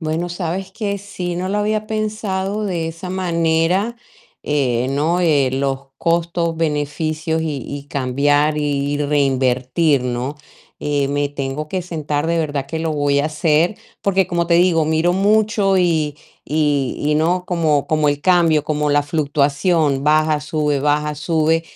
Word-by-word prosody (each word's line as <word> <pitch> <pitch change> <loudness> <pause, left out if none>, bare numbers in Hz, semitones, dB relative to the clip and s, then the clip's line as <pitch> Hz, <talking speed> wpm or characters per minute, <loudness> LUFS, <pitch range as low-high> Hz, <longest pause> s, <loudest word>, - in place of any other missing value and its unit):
Bueno, 160 +2 -2
¿sabes 180 +2 -4
qué?, 200 -1 -3
sí, 180 -3 -5
no 185 +1 -2
lo 205 +2 0
había 215 +1 -1
pensado 215 -2 -2
de 170 -5 -2
esa 165 +3 -7
manera, 180 +4 +1 0.5
eh, 130 -4 0
¿no?, 155 +6 +1
eh, 145 -6 +3
los 135 0 -2
costos, 170 0 0
beneficios 155 +1 -1
y 155 -3 -2
y 140 0 -7
cambiar 145 +3 +1
y 145 -1 -1
reinvertir, 135 0 +1
¿no?, 125 +3 -3 0.5
eh, 145 -1 0
me 145 +1 0
tengo 140 +1 -4
que 185 +3 -2
sentar, 155 -4 -3
de 170 0 +1
verdad 145 -4 -2
que 160 +3 -4
lo 160 -1 -1
voy 145 -1 +1
a 145 - 0
hacer, 155 +5 +1 0.3
porque 190 -2 +2
como 170 -2 -1
te 170 - +4
digo, 170 -2 +4
miro 160 +3 +2
mucho 205 0 +2
y 160 -5 +1 0.3
y 145 -3 0
y 150 +1 0
no, 175 +4 +1
como 160 -5 +1
como 155 -1 +1
el 145 0 0
cambio, 165 -3 +3
como 150 -1 0
la 145 0 +3
fluctuación, 145 0 +1
baja, 155 +1 +3
sube, 150 -2 -1
baja, 150 +1 +1
sube, 160 +1 +1
155 Hz, 155 wpm, -19 LUFS, 145-175 Hz, 0.5 s, te